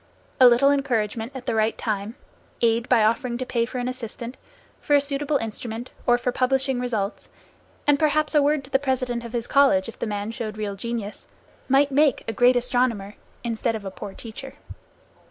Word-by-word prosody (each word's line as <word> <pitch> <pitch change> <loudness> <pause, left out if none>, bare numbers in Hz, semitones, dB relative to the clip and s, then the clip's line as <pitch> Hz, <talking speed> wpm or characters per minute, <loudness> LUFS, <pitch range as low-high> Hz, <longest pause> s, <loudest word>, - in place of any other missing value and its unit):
A 255 - +9
little 245 +4 +5
encouragement 230 -4 -1
at 255 -1 -7
the - - -1
right 220 0 +1
time, 215 +1 -3 0.5
aid 230 +1 +2
by 235 -4 +5
offering 235 +2 +1
to 255 - -3
pay 235 -2 0
for 255 - -6
an 245 0 -2
assistant, 245 0 -6 0.4
for 290 - +2
a - - +7
suitable 280 +1 0
instrument, 225 +1 -6 0.2
or 240 0 +5
for 245 +1 -1
publishing 265 +1 +1
results, 220 -5 -3 0.6
and 290 -1 +4
perhaps 305 0 +2
a 300 - +5
word 290 0 +2
to 265 - -15
the 270 - +3
president 255 -3 -1
of 235 0 -8
his 235 -1 -2
college 270 -10 +4
if 230 - -10
the - - -2
man 205 +1 -3
showed 215 -2 -5
real 205 -2 -3
genius, 220 0 -5 0.4
might 275 +2 +4
make 285 0 +3
a 225 - -2
great 245 +4 +4
astronomer, 245 -5 0 0.3
instead 230 0 -1
of 210 -2 -6
a 195 - -4
poor 195 +1 -8
teacher. 240 +4 -9
245 Hz, 190 wpm, -24 LUFS, 225-265 Hz, 0.6 s, A